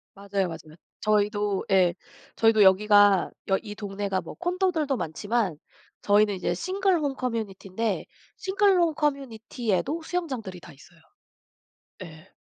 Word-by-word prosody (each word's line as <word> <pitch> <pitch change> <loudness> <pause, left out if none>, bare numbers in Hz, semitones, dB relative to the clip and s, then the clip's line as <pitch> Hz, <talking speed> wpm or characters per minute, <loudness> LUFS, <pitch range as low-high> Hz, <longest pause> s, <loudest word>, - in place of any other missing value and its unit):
맞아요, 200 -1 -2
맞아요. 160 -2 -10 0.3
저희도 210 -1 0
예. 180 -3 +4 0.4
저희도 225 -2 +4
여기가 205 0 +5 0.2
여 195 - +3
이 210 -2 -8
동네가 200 -2 -3
뭐 - - -9
콘도들도 350 -5 0
많지만 200 +1 -2 0.4
저희는 205 0 +3
이제 185 - -2
싱글 375 0 0
홈 285 -3 -2
커뮤니티인데 220 -4 -3 0.3
싱글 390 0 +2
홈 335 -2 +2
커뮤니티에도 270 - -2
수영장들이 260 - -4
다 170 -2 -14
있어요. 165 +5 -19 1.0
예. 160 0 -13
210 Hz, 300 characters per minute, -26 LUFS, 190-280 Hz, 1.0 s, 여기가